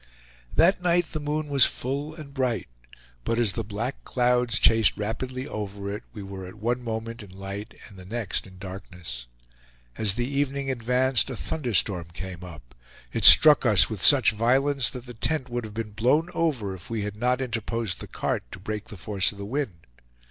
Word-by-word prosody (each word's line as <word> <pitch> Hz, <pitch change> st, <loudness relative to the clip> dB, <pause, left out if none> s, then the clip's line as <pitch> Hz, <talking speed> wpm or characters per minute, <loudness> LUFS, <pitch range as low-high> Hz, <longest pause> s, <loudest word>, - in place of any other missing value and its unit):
That 180 Hz, +3 st, +4 dB
night 175 Hz, -1 st, +1 dB
the 155 Hz, -, -3 dB
moon 150 Hz, +1 st, -2 dB
was 140 Hz, -3 st, +4 dB
full 140 Hz, +4 st, -3 dB
and 150 Hz, -4 st, -11 dB
bright; 130 Hz, -4 st, -1 dB, 0.6 s
but 115 Hz, -, -1 dB
as 115 Hz, -5 st, +4 dB
the 115 Hz, -, -3 dB
black 110 Hz, +6 st, -5 dB
clouds 125 Hz, -1 st, +1 dB
chased 110 Hz, -2 st, +4 dB
rapidly 130 Hz, +5 st, -4 dB
over 100 Hz, -1 st, -5 dB
it, 105 Hz, -, -7 dB
we 105 Hz, -, -8 dB
were 95 Hz, -1 st, -8 dB
at 95 Hz, -, -11 dB
one 120 Hz, +3 st, -2 dB
moment 115 Hz, 0 st, -5 dB
in 105 Hz, -, -12 dB
light 95 Hz, +3 st, -8 dB
and -, -, -14 dB
at 100 Hz, -, -15 dB
the 115 Hz, -, -5 dB
next 110 Hz, -6 st, -2 dB
in 95 Hz, -1 st, -15 dB
darkness. 90 Hz, -, -8 dB, 0.7 s
As 105 Hz, -3 st, +3 dB
the 120 Hz, -, -1 dB
evening 140 Hz, 0 st, -1 dB
advanced, 125 Hz, +1 st, +1 dB
a 130 Hz, -, -4 dB
thunderstorm 105 Hz, -, -1 dB
came 90 Hz, -1 st, -7 dB
up; 75 Hz, -9 st, -12 dB, 0.4 s
it -, -, +1 dB
struck 150 Hz, -1 st, +9 dB
us 110 Hz, -3 st, +4 dB
with 105 Hz, -4 st, -5 dB
such 140 Hz, -6 st, +7 dB
violence 130 Hz, +5 st, +2 dB
that 125 Hz, -2 st, -9 dB
the 120 Hz, -, -9 dB
tent 130 Hz, +3 st, -1 dB
would 120 Hz, -1 st, -3 dB
have 105 Hz, -1 st, -10 dB
been 110 Hz, -2 st, -4 dB
blown 130 Hz, +11 st, +1 dB
over 130 Hz, -13 st, -1 dB
if 95 Hz, -, -12 dB
we 115 Hz, -2 st, -2 dB
had 105 Hz, 0 st, -5 dB
not 125 Hz, +3 st, 0 dB
interposed 115 Hz, -5 st, -3 dB
the -, -, -8 dB
cart -, -, -2 dB
to -, -, -9 dB
break 105 Hz, +2 st, -5 dB
the 105 Hz, -, -10 dB
force 95 Hz, +1 st, +1 dB
of 105 Hz, -, -14 dB
the 100 Hz, -, -6 dB
wind. 105 Hz, -, -4 dB
115 Hz, 195 wpm, -25 LUFS, 100-130 Hz, 0.7 s, struck